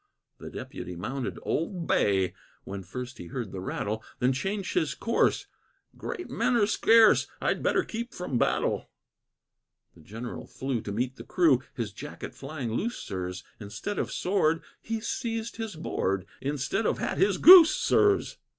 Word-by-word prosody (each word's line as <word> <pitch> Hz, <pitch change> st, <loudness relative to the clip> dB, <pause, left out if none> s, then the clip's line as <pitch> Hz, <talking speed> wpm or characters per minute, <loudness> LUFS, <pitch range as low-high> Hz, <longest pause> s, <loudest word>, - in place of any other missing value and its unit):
The -, -, -8 dB
Deputy 90 Hz, -, -7 dB
mounted 120 Hz, +9 st, -4 dB
"Old 170 Hz, +1 st, -2 dB
Bay," 95 Hz, -, +2 dB, 0.3 s
When 100 Hz, 0 st, -6 dB
first 120 Hz, +7 st, -7 dB
he 85 Hz, -, -8 dB
heard 115 Hz, -1 st, -5 dB
the 95 Hz, -, -6 dB
rattle, 105 Hz, +3 st, -3 dB
Then 125 Hz, +2 st, +2 dB
changed 195 Hz, +8 st, -3 dB
his 145 Hz, -4 st, 0 dB
course 230 Hz, -, +1 dB, 0.5 s
"Great 360 Hz, -, -6 dB
men 245 Hz, +2 st, 0 dB
are 220 Hz, -3 st, +4 dB
scarce, 225 Hz, +1 st, +5 dB
I'd -, -, 0 dB
better -, -, +2 dB
keep 235 Hz, +2 st, -5 dB
from 140 Hz, -9 st, -3 dB
battle." -, -, 0 dB, 1.0 s
The 85 Hz, -, -18 dB
General 115 Hz, +8 st, -7 dB
flew 130 Hz, -4 st, -3 dB
to 100 Hz, -, -6 dB
meet 125 Hz, +5 st, -2 dB
the -, -, -8 dB
crew, 155 Hz, -9 st, +3 dB
His 110 Hz, -4 st, -4 dB
jacket -, -, -8 dB
flying 135 Hz, -4 st, -5 dB
loose, 230 Hz, -, -2 dB
sirs; 90 Hz, -1 st, -5 dB, 0.2 s
Instead 105 Hz, -, -5 dB
of -, -, -2 dB
sword, 165 Hz, -4 st, +1 dB, 0.2 s
he 225 Hz, 0 st, -3 dB
seized 230 Hz, -1 st, -3 dB
his 225 Hz, -4 st, -5 dB
board; 95 Hz, -, -2 dB, 0.2 s
Instead 145 Hz, -, -1 dB
of -, -, 0 dB
hat, -, -, -2 dB
his 195 Hz, -1 st, +3 dB
goose, 350 Hz, -1 st, +10 dB
sirs. 405 Hz, -1 st, +2 dB
135 Hz, 160 wpm, -28 LUFS, -, 1.0 s, goose